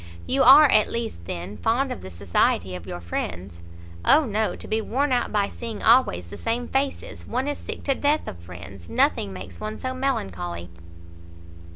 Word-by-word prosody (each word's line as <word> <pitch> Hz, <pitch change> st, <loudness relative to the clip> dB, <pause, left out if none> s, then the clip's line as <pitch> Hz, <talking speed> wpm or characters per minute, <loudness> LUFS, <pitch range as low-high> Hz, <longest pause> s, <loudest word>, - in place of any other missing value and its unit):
"You 270 Hz, +1 st, +1 dB
are, 275 Hz, +5 st, +9 dB
at 215 Hz, -5 st, +4 dB
least, 225 Hz, -, -4 dB
then, 90 Hz, +5 st, -6 dB
fond 255 Hz, -, +1 dB
of 250 Hz, -, -5 dB
the -, -, -8 dB
society 90 Hz, 0 st, 0 dB
of 90 Hz, -2 st, -8 dB
your 85 Hz, -, -6 dB
friends?" 85 Hz, +1 st, -5 dB, 0.4 s
"O 305 Hz, +1 st, +6 dB
no! 215 Hz, -1 st, -1 dB
to -, -, -10 dB
be 220 Hz, +1 st, 0 dB
worn 270 Hz, +6 st, 0 dB
out 245 Hz, -1 st, +1 dB
by 205 Hz, -2 st, +1 dB
seeing 230 Hz, -1 st, -7 dB
always 155 Hz, -, +4 dB
the -, -, -7 dB
same 235 Hz, +1 st, -2 dB
faces! 270 Hz, +1 st, -3 dB
one 255 Hz, +4 st, -1 dB
is 290 Hz, -, -2 dB
sick -, -, -7 dB
to 275 Hz, -, +2 dB
death 290 Hz, +3 st, 0 dB
of 85 Hz, -, -7 dB
friends; 90 Hz, +1 st, -11 dB
nothing 100 Hz, +5 st, +1 dB
makes 95 Hz, 0 st, -9 dB
one 215 Hz, 0 st, -5 dB
so 255 Hz, 0 st, -3 dB
melancholy." 90 Hz, -, -3 dB
215 Hz, 185 wpm, -24 LUFS, -, 0.4 s, are